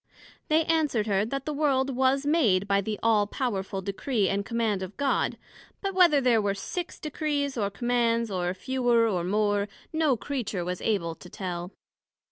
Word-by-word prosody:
They 315 +1 +3
answered 305 -9 +1
her, 200 -1 +1
That 275 +4 -4
the 305 - -2
World 275 -3 +1
was 265 +2 +2
made 225 - +3
by 200 0 +3
the 210 +1 -4
All 215 -2 +3
powerful 195 -5 -3
Decree 200 +2 0
and 200 +1 0
Command 225 -3 -1
of 190 +1 -7
God; 280 -1 0 0.4
but 390 -1 -3
whether 350 -6 +5
there 245 -4 +3
were 200 -1 0
six 350 - -5
Decrees 290 -2 -2
or 205 -4 0
Commands, 235 +1 0
or 180 -2 -1
fewer, 240 +1 +2
or 180 -5 0
more, 205 +2 +1 0.3
no 310 -5 +2
Creature 215 -8 -3
was 180 0 -3
able 180 -7 0
to 180 +2 -14
tell. 180 -1 -5
230 Hz, 170 wpm, -27 LUFS, 200-275 Hz, 0.4 s, whether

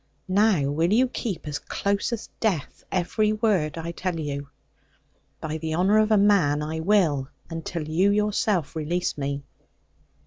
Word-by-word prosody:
Now 195 -4 +3
will 165 +5 +1
you 250 +5 +4
keep, 195 -10 -4
as 145 -1 -3
close 200 +2 -1
as 230 -2 -5
death, 190 - -1
every 210 +4 +1
word 200 -9 +1
I 165 +1 -4
tell 175 -1 -3
you?' 140 -2 -4 0.9
'By 155 0 -4
the 160 0 -2
honour 195 +5 +4
of 215 0 +3
a 215 - +5
man, 180 -8 +3
I 160 +1 -3
will. 160 -7 +2 0.2
Until 165 -1 -4
you 175 +6 +3
yourself 205 -6 +1
release 165 +3 -1
me.' 140 0 -3
175 Hz, 150 wpm, -25 LUFS, 155-205 Hz, 0.9 s, a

